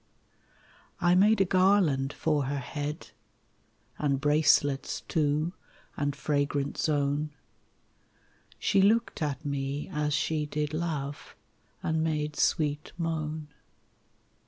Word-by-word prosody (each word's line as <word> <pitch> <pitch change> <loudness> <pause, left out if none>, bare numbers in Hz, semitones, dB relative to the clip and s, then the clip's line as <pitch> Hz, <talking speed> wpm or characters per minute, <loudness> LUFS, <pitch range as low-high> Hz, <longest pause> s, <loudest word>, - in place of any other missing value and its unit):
I 175 0 +4
made 200 +3 +5
a - - +5
garland 185 -8 +3
for 150 -3 0
her 140 +2 -2
head, 145 +3 -5 0.9
And 140 -2 +1
bracelets 145 -1 +2
too, 155 +2 0 0.4
and 145 -1 -1
fragrant 145 -1 -1
zone; 145 0 +1 1.3
She 195 - +2
looked 220 0 +2
at 145 0 -2
me 140 0 -3
as 150 -1 0
she 155 -1 0
did 150 0 -2
love, 150 -4 -4 0.5
And 160 0 0
made 150 -1 -1
sweet 150 -1 0
moan. 155 -2 -3
150 Hz, 105 wpm, -29 LUFS, 145-160 Hz, 1.3 s, made